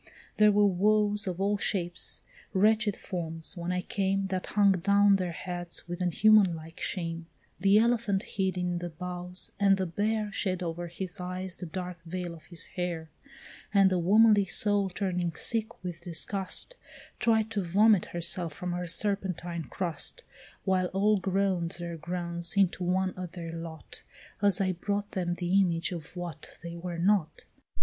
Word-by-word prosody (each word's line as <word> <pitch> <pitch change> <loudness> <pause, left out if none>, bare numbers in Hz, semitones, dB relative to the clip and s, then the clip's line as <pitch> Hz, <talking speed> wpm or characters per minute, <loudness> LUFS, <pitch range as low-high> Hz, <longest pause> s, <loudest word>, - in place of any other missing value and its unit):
There 210 0 +6
were 205 0 +4
woes 210 +2 +2
of 180 -1 -3
all 200 +1 +1
shapes, 175 -5 +3 0.3
wretched 215 +1 +3
forms, 165 -1 -5
when 175 0 -3
I 180 0 -1
came, 195 0 0
That 185 -1 -3
hung 200 -1 +4
down 200 +2 +4
their 180 -2 -2
heads 175 0 0
with 175 +1 -5
a 180 - +2
human 205 -1 +5
like 160 +1 -11
shame; 165 -3 -3 0.3
The 195 +2 +5
elephant 225 -3 +2
hid 190 -2 -2
in 180 -1 -1
the 175 0 -5
boughs, 180 +2 -4
and 195 -1 +4
the 190 - -1
bear 210 +4 -1
Shed 185 -2 -2
over 170 +1 -4
his 185 +2 -6
eyes 185 0 -5
the 180 - -7
dark 180 0 -6
veil 175 0 -5
of 165 - -14
his 170 -2 -2
hair; 170 -3 -4 0.6
And 195 -1 +6
the 185 - +2
womanly 205 +3 +5
soul 205 +1 +3
turning 180 -3 -2
sick 225 -4 -1
with 175 -2 -6
disgust, 190 - -1 0.4
Tried 220 -2 +2
to 210 -2 -1
vomit 200 +2 +4
herself 170 -1 -1
from 180 +3 -5
her 175 0 -3
serpentine 175 -3 -1
crust; 165 - -3 0.4
While 185 -1 +1
all 200 +3 +2
groan'd 190 -2 0
their 170 -1 -5
groans 170 +2 -2
into 190 -2 +2
one 185 +1 0
at 180 -2 -6
their 170 -2 -6
lot, 165 -1 -8 0.4
As 200 -3 +4
I 190 -1 +1
brought 205 +3 -3
them 175 -2 -2
the 180 +2 +1
image 170 -1 0
of 170 0 -7
what 175 -4 -7
they 170 0 -6
were 170 0 -5
not. 175 -3 +1
180 Hz, 165 wpm, -29 LUFS, 175-200 Hz, 0.6 s, There